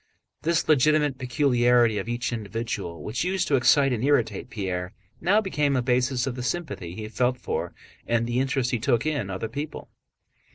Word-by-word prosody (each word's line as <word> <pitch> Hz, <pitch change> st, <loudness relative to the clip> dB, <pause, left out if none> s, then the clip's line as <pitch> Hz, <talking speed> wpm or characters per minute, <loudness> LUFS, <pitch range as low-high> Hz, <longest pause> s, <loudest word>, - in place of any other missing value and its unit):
This 165 Hz, +1 st, +1 dB
legitimate 150 Hz, -1 st, +3 dB
peculiarity 120 Hz, -4 st, +3 dB
of -, -, -5 dB
each 120 Hz, +1 st, -2 dB
individual 110 Hz, -5 st, -4 dB
which 115 Hz, +7 st, -2 dB
used 185 Hz, +1 st, 0 dB
to 145 Hz, -, +4 dB
excite 135 Hz, +1 st, +4 dB
and 120 Hz, -1 st, -2 dB
irritate 120 Hz, -8 st, +1 dB
Pierre 90 Hz, -3 st, -4 dB, 0.3 s
now 200 Hz, +6 st, +3 dB
became 150 Hz, -8 st, 0 dB
a 130 Hz, -, +2 dB
basis 125 Hz, 0 st, +1 dB
of 135 Hz, -, -2 dB
the 125 Hz, -, -5 dB
sympathy 120 Hz, -, -4 dB
he 110 Hz, +1 st, -6 dB
felt 125 Hz, +4 st, 0 dB
for, -, -, -3 dB, 0.4 s
and 115 Hz, 0 st, +1 dB
the 120 Hz, +1 st, -1 dB
interest 130 Hz, -1 st, 0 dB
he 125 Hz, -, 0 dB
took 120 Hz, +1 st, +1 dB
in, 145 Hz, -10 st, -1 dB
other 95 Hz, +4 st, -3 dB
people. 145 Hz, +7 st, -6 dB
125 Hz, 175 wpm, -25 LUFS, 115-145 Hz, 0.4 s, to